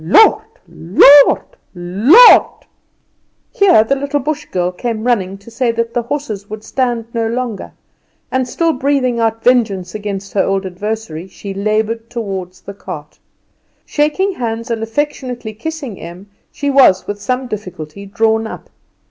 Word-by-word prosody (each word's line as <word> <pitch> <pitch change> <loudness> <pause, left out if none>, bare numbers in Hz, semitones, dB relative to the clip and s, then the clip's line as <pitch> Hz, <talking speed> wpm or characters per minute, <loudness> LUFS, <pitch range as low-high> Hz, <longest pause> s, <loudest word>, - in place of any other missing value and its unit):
Lord, 420 - +5 0.3
Lord, 275 - +5 0.3
Lord!" 210 - +5 0.9
Here 375 - +4
the 270 +5 0
little 280 +1 -2
Bush 300 +2 -3
girl 180 0 -2
came 220 +4 -4
running 195 -6 0
to 200 +4 -16
say 240 +1 0
that 230 0 -2
the 240 - 0
horses 235 -6 -5
would 215 0 -8
stand 240 -3 -2
no 230 -1 -1
longer, 235 -2 -4 0.6
and 260 -1 0
still 330 +6 0
breathing 255 -3 0
out 225 0 -1
vengeance 215 -8 +1
against 200 -2 -6
her 200 - +2
old 195 0 -1
adversary 190 -2 -5
she 195 +1 -8
laboured 215 +3 -2
toward 195 -6 -5
the 200 +2 -11
cart. 150 -6 -9 0.7
Shaking 305 +7 0
hands 230 -6 -4
and 225 -1 -2
affectionately 245 -1 -4
kissing 275 -2 -6
Em, 180 +4 -11 0.2
she 285 -1 -2
was 260 -9 +5
with 205 0 -6
some 255 +2 -2
difficulty 200 -4 -8
drawn 220 +2 0
up. - - -10
225 Hz, 145 wpm, -16 LUFS, 200-255 Hz, 0.9 s, Lord